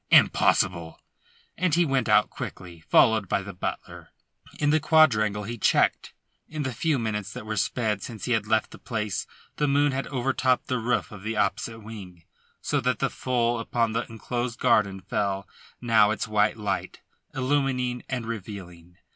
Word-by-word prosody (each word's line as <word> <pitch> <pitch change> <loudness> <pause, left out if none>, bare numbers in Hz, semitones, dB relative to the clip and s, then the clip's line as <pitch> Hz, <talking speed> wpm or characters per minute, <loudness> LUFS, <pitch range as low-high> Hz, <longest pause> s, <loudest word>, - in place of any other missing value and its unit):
Impossible!" 85 -3 +3 0.6
and 180 -3 +1
he 175 0 +4
went 135 -5 0
out 105 0 +4
quickly, 85 -2 -8
followed 110 +4 +3
by 100 - 0
the 100 +1 -8
butler. 90 - -6 0.5
In 145 0 +2
the 155 - +4
quadrangle 110 -11 +3
he 115 +3 -6
checked. - - +2 0.3
In 155 -1 -4
the 130 -2 -3
few 155 +5 0
minutes 105 -4 -3
that - - -8
were 110 0 -3
sped 105 +1 0
since 110 -1 -7
he 125 - -2
had 110 -2 +1
left 110 0 +1
the - - -12
place 105 -4 -3 0.3
the 150 - +1
moon 145 +1 +3
had 135 +1 -3
overtopped 130 -1 0
the 125 - 0
roof 120 +2 -1
of 105 -3 -10
the 110 +2 -3
opposite 115 +3 -1
wing, 100 -6 -10 0.4
so - - 0
that - - 0
full 120 -2 0
upon 115 0 0
the 115 +1 -2
enclosed 120 +1 -4
garden 105 -6 +2
fell 100 +1 -2 0.3
now 110 -3 +4
its 110 - -2
white 105 +1 +2
light, 105 -1 -3 0.3
illumining 130 -2 0
and 125 -3 -3
revealing. 90 -6 -8
115 Hz, 165 wpm, -26 LUFS, 105-125 Hz, 0.6 s, he